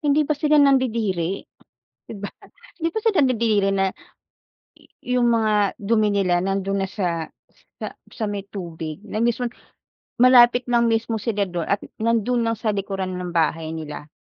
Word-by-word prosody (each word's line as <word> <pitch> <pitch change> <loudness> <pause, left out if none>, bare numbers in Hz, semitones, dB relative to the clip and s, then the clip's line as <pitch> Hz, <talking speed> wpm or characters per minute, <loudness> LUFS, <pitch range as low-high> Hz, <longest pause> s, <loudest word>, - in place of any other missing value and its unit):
hindi 295 0 +2
ba 305 - 0
sila 300 +1 +2
nandidiri, 225 - +2 0.6
‘di - - -8
ba? 205 0 -6 0.5
Hindi 330 -1 0
ba - - +1
sila 435 -4 +2
nandidiri 220 -6 +2
na, 195 -1 +1 1.1
yu 250 0 -1
yung 240 - +3
mga 220 -2 +2 0.3
dumi 215 +1 +2
nila 195 -3 +1
nando'n 195 +1 -1
na 195 - -2
sa 170 -5 -2 0.5
sa - - -4 0.2
sa 225 - -4
may 205 -1 -3
tubig, 165 -5 -6
na 215 - -3
mismon 240 +1 0 0.7
malapit 245 0 +6
lang 235 -1 +3
mismo 225 0 0
sila 210 -1 -1
do'n, 175 -2 -3
at 200 - 0 0.2
nando'n 230 +1 +1
lang 230 - +1
sa 220 0 0
likuran 195 -2 -3
ng 180 -1 -5
bahay 160 -1 0
nila. 150 -2 -7
215 Hz, 160 wpm, -22 LUFS, 190-240 Hz, 1.1 s, malapit